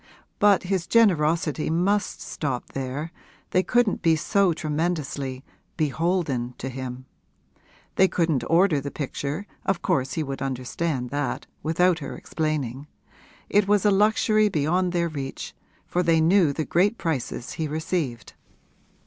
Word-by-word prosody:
But 205 Hz, -1 st, +5 dB
his 185 Hz, -2 st, -1 dB
generosity 165 Hz, -8 st, +2 dB
must 195 Hz, +6 st, 0 dB
stop 135 Hz, -5 st, -4 dB
there 135 Hz, +4 st, -4 dB, 0.4 s
they 185 Hz, -, +4 dB
couldn't 240 Hz, +1 st, +1 dB
be 165 Hz, -1 st, +4 dB
so 195 Hz, +4 st, +2 dB
tremendously 150 Hz, -4 st, -2 dB, 0.3 s
'beholden' 155 Hz, -5 st, 0 dB
to 130 Hz, -, -5 dB
him. 130 Hz, 0 st, -6 dB, 0.9 s
They 190 Hz, -, +6 dB
couldn't 165 Hz, -9 st, 0 dB
order 165 Hz, -3 st, +4 dB
the 140 Hz, -, -4 dB
picture 145 Hz, +5 st, -4 dB, 0.2 s
of 190 Hz, -2 st, -1 dB
course 130 Hz, 0 st, 0 dB
he 160 Hz, -, -1 dB
would 135 Hz, -2 st, -5 dB
understand 130 Hz, +1 st, -2 dB
that, 145 Hz, -3 st, -2 dB, 0.2 s
without 175 Hz, +3 st, +2 dB
her 145 Hz, -, -6 dB
explaining: 145 Hz, -4 st, -3 dB, 0.6 s
it 205 Hz, -1 st, +3 dB
was 205 Hz, 0 st, +3 dB
a 205 Hz, -, +5 dB
luxury 215 Hz, +1 st, +3 dB
beyond 175 Hz, +3 st, +1 dB
their 170 Hz, -1 st, +1 dB
reach, 140 Hz, -4 st, -6 dB, 0.3 s
for 180 Hz, -, 0 dB
they 165 Hz, -2 st, +3 dB
knew 165 Hz, -1 st, +4 dB
the 155 Hz, +2 st, -3 dB
great 200 Hz, +6 st, +2 dB
prices 135 Hz, -6 st, -3 dB
he 160 Hz, -, -3 dB
received. 150 Hz, -, -3 dB
160 Hz, 135 wpm, -25 LUFS, 140-180 Hz, 0.9 s, They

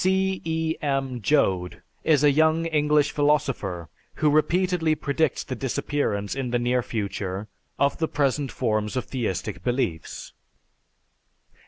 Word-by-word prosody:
C. 190 Hz, 0 st, +1 dB
E. 160 Hz, 0 st, -1 dB
M. 135 Hz, -4 st, -1 dB
Joad 95 Hz, -10 st, +1 dB, 0.2 s
is 150 Hz, -3 st, +3 dB
a 145 Hz, -, +6 dB
young 160 Hz, +3 st, +3 dB
English 150 Hz, -2 st, +2 dB
philosopher 135 Hz, -, 0 dB, 0.3 s
who 150 Hz, -1 st, +2 dB
repeatedly 170 Hz, +1 st, +2 dB
predicts 150 Hz, -1 st, 0 dB
the -, -, -5 dB
disappearance 130 Hz, -5 st, -1 dB
in 135 Hz, -2 st, -3 dB
the 120 Hz, -, +1 dB
near 125 Hz, +1 st, +1 dB
future 100 Hz, -3 st, -4 dB, 0.3 s
of 140 Hz, 0 st, +1 dB
the 160 Hz, -, +1 dB
present 140 Hz, -2 st, 0 dB
forms 110 Hz, -1 st, -1 dB
of 130 Hz, -, -1 dB
theistic 110 Hz, -9 st, -3 dB
beliefs. 120 Hz, -11 st, -2 dB
140 Hz, 130 wpm, -25 LUFS, 115-155 Hz, 0.3 s, a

